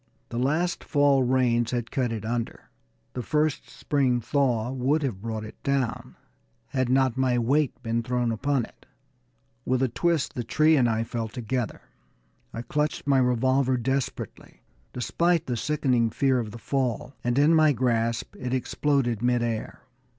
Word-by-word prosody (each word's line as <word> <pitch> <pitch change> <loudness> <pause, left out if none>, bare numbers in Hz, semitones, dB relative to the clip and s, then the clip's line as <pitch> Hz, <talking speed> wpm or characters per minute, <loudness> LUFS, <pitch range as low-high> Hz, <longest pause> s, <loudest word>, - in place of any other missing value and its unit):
The 120 - -3
last 160 +7 0
fall 145 -2 +3
rains 120 -2 +2
had 120 -2 -3
cut 130 -4 0
it 110 -2 -4
under; 115 0 -4 0.4
the 125 - -3
first 150 +4 0
spring 130 -4 0
thaw 125 -2 0
would 135 +4 0
have 110 -9 -3
brought 110 -1 -4
it 110 - -11
down, 135 -5 -2 0.5
had 130 -2 0
not 130 -1 +2
my 130 -2 +2
weight 130 +3 +1
been 115 0 0
thrown 125 0 -1
upon 130 +2 0
it. - - -22 0.8
With 130 +1 +1
a - - +3
twist 170 +4 0
the 120 - -3
tree 155 +7 +3
and 125 -5 +3
I 110 0 0
fell 115 0 -3
together. 120 0 -4 0.7
I 115 - -6
clutched 150 +3 -1
my 140 -2 +3
revolver 130 +1 +2
desperately, 130 +2 -4 0.3
despite 170 +6 +1
the 125 - -2
sickening 125 -3 +1
fear 130 +2 +1
of 115 -3 -3
the 110 - -9
fall, 130 0 -2
and 120 +1 0
in 150 +3 +5
my 155 -2 +5
grasp 115 -3 0
it 125 0 -2
exploded 130 -2 0
in 120 - +2
mid 120 -1 +2
air. 115 -2 -4
125 Hz, 165 wpm, -26 LUFS, 120-140 Hz, 0.8 s, in